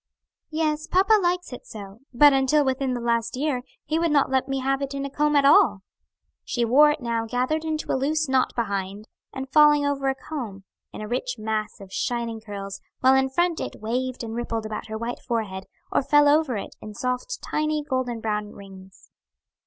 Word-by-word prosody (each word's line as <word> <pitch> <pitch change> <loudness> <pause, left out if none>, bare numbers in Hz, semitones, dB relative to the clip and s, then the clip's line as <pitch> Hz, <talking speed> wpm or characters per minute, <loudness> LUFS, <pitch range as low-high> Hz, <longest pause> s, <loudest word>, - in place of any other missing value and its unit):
"Yes, 310 -1 -1
papa 400 +4 +4
likes 355 -4 -1
it 250 - -10
so, 200 -1 -10
but 285 +3 +6
until 270 +2 +3
within 265 -1 0
the - - -3
last 235 0 0
year, 275 -2 -1 0.2
he 315 +1 0
would 335 0 +1
not 285 -3 +2
let 265 0 +1
me 270 0 -1
have 270 +1 0
it 275 0 -3
in 275 0 -3
a 275 - -6
comb 300 +1 +1
at 280 -1 +4
all." 205 -8 +5 0.6
She 240 -2 -1
wore 285 +6 +6
it 295 -1 -1
now 230 -1 -2
gathered 255 +7 -1
into 315 -1 -3
a - - +1
loose 305 +4 0
knot 265 -1 +2
behind, 200 -2 -3 0.2
and 265 0 -6
falling 295 -1 +6
over 275 -1 0
a 265 - 0
comb, 240 -9 -7 0.3
in - - -8
a 215 - -5
rich 250 +2 -2
mass 215 -1 -3
of 195 -1 -12
shining 235 -2 -2
curls, 200 -2 -7 0.2
while 260 +1 +6
in 265 0 +3
front 345 +4 +1
it - - -5
waved 250 +3 -3
and 225 -1 -5
rippled 230 -1 -3
above 215 0 -5
her 220 0 -5
white 235 +2 -4
forehead, 205 -5 -3 0.3
or - - +2
fell 295 +1 +4
over 290 -5 +3
it, - - -7
in 210 -1 -9
soft, 250 - -3
tiny, 305 0 -1
golden 255 -4 -2
brown 210 -1 -2
rings. 190 -1 -14
255 Hz, 200 wpm, -24 LUFS, 220-295 Hz, 0.6 s, but